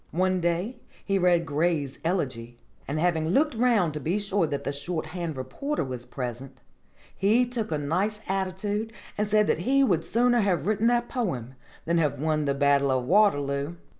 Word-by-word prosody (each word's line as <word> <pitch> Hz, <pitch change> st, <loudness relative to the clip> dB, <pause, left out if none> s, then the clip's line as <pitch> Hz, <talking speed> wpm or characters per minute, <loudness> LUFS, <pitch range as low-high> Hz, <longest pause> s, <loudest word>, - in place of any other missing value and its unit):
One 185 Hz, 0 st, +2 dB
day 175 Hz, +8 st, -1 dB, 0.3 s
he 195 Hz, -1 st, +1 dB
read 175 Hz, -2 st, +3 dB
Gray's 150 Hz, -2 st, -1 dB
'Elegy,' 125 Hz, -9 st, -2 dB, 0.3 s
and 145 Hz, +2 st, -2 dB
having 160 Hz, -2 st, +1 dB
looked 285 Hz, -, +2 dB
round 225 Hz, -9 st, +2 dB
to 150 Hz, -, -4 dB
be 165 Hz, +7 st, -1 dB
sure 200 Hz, -4 st, 0 dB
that 145 Hz, -2 st, -3 dB
the -, -, -2 dB
shorthand 160 Hz, +1 st, -4 dB
reporter 170 Hz, -, -3 dB
was 125 Hz, -2 st, -6 dB
present, 125 Hz, +1 st, -6 dB, 0.6 s
he 220 Hz, +6 st, +3 dB
took 235 Hz, -6 st, -4 dB
a 155 Hz, -, +1 dB
nice 185 Hz, +9 st, -1 dB
attitude 200 Hz, +3 st, -2 dB, 0.2 s
and 210 Hz, 0 st, 0 dB
said 210 Hz, 0 st, +3 dB
that -, -, +1 dB
he 275 Hz, +2 st, +3 dB
would 175 Hz, -10 st, +2 dB
sooner 240 Hz, +1 st, +2 dB
have 180 Hz, -8 st, +1 dB
written 215 Hz, +2 st, +2 dB
that 240 Hz, 0 st, +2 dB
poem 135 Hz, -, -3 dB, 0.3 s
than 170 Hz, +1 st, +2 dB
have 150 Hz, -5 st, 0 dB
won 155 Hz, 0 st, 0 dB
the 140 Hz, -1 st, 0 dB
Battle 140 Hz, 0 st, +3 dB
of 130 Hz, -1 st, +1 dB
Waterloo. 145 Hz, -5 st, +2 dB
175 Hz, 175 wpm, -26 LUFS, 145-210 Hz, 0.6 s, read